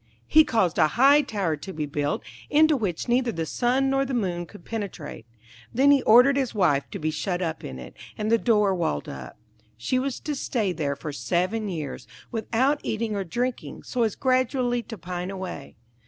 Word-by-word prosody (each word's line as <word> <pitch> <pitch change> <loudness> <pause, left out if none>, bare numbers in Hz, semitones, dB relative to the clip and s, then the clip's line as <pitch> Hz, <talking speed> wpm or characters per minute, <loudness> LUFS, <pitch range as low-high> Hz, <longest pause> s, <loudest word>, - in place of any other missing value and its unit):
He 315 - +6
caused 205 - +1
a - - +6
high 280 +4 +7
tower 200 - -1
to 190 +6 -8
be 155 -3 -3
built, 145 0 -2 0.3
into 310 +1 +5
which 200 - -2
neither 245 0 +2
the 165 -5 -3
sun 255 +7 +1
nor 270 0 +2
the 270 -1 -3
moon 175 -6 -2
could 190 -1 -14
penetrate. 200 - -6 0.4
Then 275 +4 +4
he 280 -2 +5
ordered 250 +5 +6
his 265 -4 -1
wife 145 -8 +2
to - - -6
be 155 +1 -1
shut 175 +3 -2
up 165 -3 -3
in 65 - -6
it, 60 -1 -10 0.2
and 215 +1 -1
the 230 - +4
door 210 -5 +3
walled 165 - -1
up. 65 -2 -8 0.4
She 255 - 0
was 265 -1 -2
to 300 - -3
stay 230 -7 -1
there 145 -4 -2
for 150 +1 -6
seven 185 +8 -1
years, 155 -6 -5 0.2
without 245 +5 +1
eating 220 -1 -2
or 200 - -1
drinking, 240 +7 -3
so 250 - -3
as 220 -3 +1
gradually 255 -1 +1
to 225 0 -9
pine 180 0 -5
away. 190 -1 -7
215 Hz, 195 wpm, -25 LUFS, 170-255 Hz, 0.4 s, high